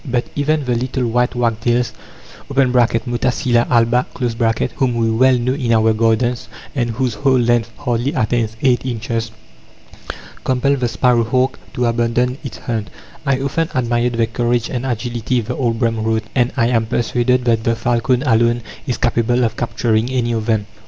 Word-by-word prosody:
But 125 Hz, -4 st, -1 dB
even 150 Hz, 0 st, 0 dB
the 125 Hz, -, 0 dB
little 125 Hz, +1 st, -1 dB
white 125 Hz, +2 st, 0 dB
wagtails 120 Hz, 0 st, 0 dB, 0.6 s
(Motacilla 125 Hz, -1 st, +1 dB
alba), 120 Hz, +1 st, +3 dB, 0.7 s
whom 130 Hz, -4 st, +1 dB
we 115 Hz, -1 st, +1 dB
well 130 Hz, +3 st, +4 dB
know 125 Hz, +2 st, 0 dB
in 130 Hz, -4 st, -1 dB
our 110 Hz, 0 st, +4 dB
gardens 115 Hz, +2 st, +1 dB, 0.3 s
and 120 Hz, -4 st, -1 dB
whose 120 Hz, +1 st, -1 dB
whole 135 Hz, 0 st, +2 dB
length 120 Hz, -1 st, +2 dB
hardly 125 Hz, -1 st, -1 dB
attains 110 Hz, -2 st, 0 dB
eight 125 Hz, -3 st, +3 dB
inches, 115 Hz, -2 st, -3 dB, 1.1 s
compel 130 Hz, +2 st, +1 dB
the 125 Hz, -3 st, -1 dB
sparrow 120 Hz, 0 st, +2 dB
hawk 130 Hz, +3 st, 0 dB, 0.2 s
to 125 Hz, -, 0 dB
abandon 120 Hz, +2 st, 0 dB
its 135 Hz, -6 st, -7 dB
hunt. 110 Hz, -3 st, -4 dB, 0.4 s
"I 135 Hz, -1 st, +1 dB
often 160 Hz, +4 st, -1 dB
admired 120 Hz, -1 st, +1 dB
their 115 Hz, 0 st, +2 dB
courage 120 Hz, 0 st, -1 dB
and 130 Hz, 0 st, -3 dB
agility," 120 Hz, 0 st, -1 dB
the 120 Hz, +3 st, -4 dB
old 120 Hz, -4 st, 0 dB
Brehm 115 Hz, -2 st, 0 dB
wrote, 110 Hz, 0 st, 0 dB
"and 125 Hz, -1 st, +2 dB
I 115 Hz, -1 st, +3 dB
am 115 Hz, -2 st, +1 dB
persuaded 125 Hz, +1 st, +1 dB
that 115 Hz, -2 st, +2 dB
the 115 Hz, 0 st, +1 dB
falcon 120 Hz, +2 st, 0 dB
alone 120 Hz, -2 st, +2 dB, 0.2 s
is 125 Hz, -, -1 dB
capable 120 Hz, 0 st, +1 dB
of 110 Hz, -2 st, 0 dB
capturing 115 Hz, -1 st, 0 dB
any 125 Hz, -2 st, 0 dB
of 110 Hz, -1 st, -2 dB
them.... 110 Hz, -3 st, +1 dB
120 Hz, 165 wpm, -18 LUFS, 115-125 Hz, 1.1 s, well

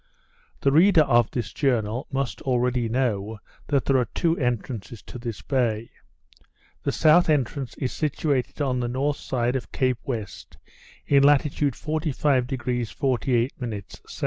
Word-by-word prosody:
The 140 Hz, -, +3 dB
reader 165 Hz, +2 st, +6 dB
of 120 Hz, -5 st, +3 dB
this 115 Hz, -4 st, -4 dB
journal 120 Hz, -3 st, 0 dB
must 135 Hz, -1 st, -2 dB
already 125 Hz, -2 st, 0 dB
know 110 Hz, -4 st, -1 dB, 0.3 s
that 140 Hz, -3 st, +1 dB
there 135 Hz, -, +3 dB
are 125 Hz, -, +1 dB
two 165 Hz, -1 st, +2 dB
entrances 120 Hz, -3 st, -3 dB
to 125 Hz, -, -9 dB
this 115 Hz, -3 st, -6 dB
bay. 115 Hz, -5 st, -1 dB, 0.9 s
The -, -, -1 dB
south 160 Hz, +2 st, +4 dB
entrance 135 Hz, -2 st, 0 dB
is 130 Hz, -, -3 dB
situated 145 Hz, -3 st, -1 dB
on 130 Hz, -2 st, 0 dB
the 120 Hz, -, -1 dB
north 140 Hz, +4 st, -1 dB
side 125 Hz, 0 st, -1 dB
of 130 Hz, -, -4 dB
Cape 130 Hz, -3 st, 0 dB
West, 110 Hz, -7 st, -6 dB, 0.5 s
in 140 Hz, -1 st, +4 dB
latitude 145 Hz, -1 st, +3 dB
45° 130 Hz, -6 st, -1 dB
48' 130 Hz, -2 st, +1 dB, 0.5 s
S. -, -, -11 dB
130 Hz, 140 wpm, -25 LUFS, 120-140 Hz, 0.9 s, reader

